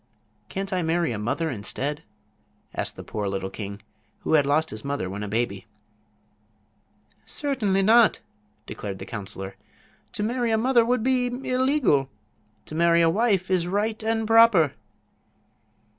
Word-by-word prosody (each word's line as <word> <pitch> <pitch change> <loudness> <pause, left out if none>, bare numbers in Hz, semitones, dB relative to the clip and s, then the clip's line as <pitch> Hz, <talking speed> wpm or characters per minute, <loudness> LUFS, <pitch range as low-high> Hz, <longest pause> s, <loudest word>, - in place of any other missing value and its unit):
"Can't 195 +1 -4
I 185 - +1
marry 165 -3 0
a 110 - -3
mother, 140 +9 -1
instead?" 135 +6 -3 0.7
asked - - -3
the - - -9
poor 105 -2 -4
little 95 0 -3
king, 100 -1 -7 0.4
who - - -1
had 145 -3 +4
lost 155 +3 +2
his 110 0 -6
mother 140 -8 -2
when 100 +2 -5
a 105 - -4
baby. 105 -2 -2 1.6
"Certainly 215 -10 0
not," 225 +2 +5 0.5
declared 100 -2 -6
the - - -8
counselor. 95 -3 -7 0.6
"To 210 - -2
marry 240 +2 0
a 220 - +2
mother 240 +1 +4
would 240 -1 0
be 255 -1 +2
illegal; 255 - +1 0.6
to - - -10
marry 170 +1 +4
a 165 - +4
wife 195 -3 +1
is 175 -2 +2
right 210 +4 -1
and 225 0 0
proper." 225 - +5
170 Hz, 145 wpm, -25 LUFS, -, 1.6 s, not